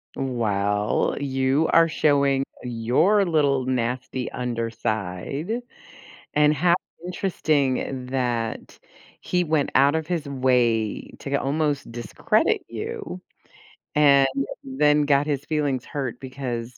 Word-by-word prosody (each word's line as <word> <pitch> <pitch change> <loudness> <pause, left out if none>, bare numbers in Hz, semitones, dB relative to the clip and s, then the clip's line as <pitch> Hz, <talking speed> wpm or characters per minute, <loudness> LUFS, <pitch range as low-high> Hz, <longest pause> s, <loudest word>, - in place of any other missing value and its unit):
Well, 105 -5 0
you 135 +2 +1
are 165 0 +6
showing 140 -3 +2 0.2
your 125 - +2
little 140 -6 +2
nasty 125 0 -2
underside 115 - -3 0.7
and 150 0 +5
how 170 +3 +3 0.3
interesting 140 -8 -1
that 120 -3 -2 0.4
he 180 0 0
went 155 -4 0
out 140 +3 +5
of 160 -1 -1
his 170 -4 -2
way 125 -5 +1
to 140 0 -4
almost 145 -1 -1
discredit 120 -1 0
you 90 +1 -6 0.7
and 140 -2 +6 0.4
then 150 +3 +2
got 145 0 +3
his 145 -2 -2
feelings 145 -5 -1
hurt 135 -5 -4
because 125 -3 -5
135 Hz, 105 wpm, -24 LUFS, 120-150 Hz, 0.7 s, are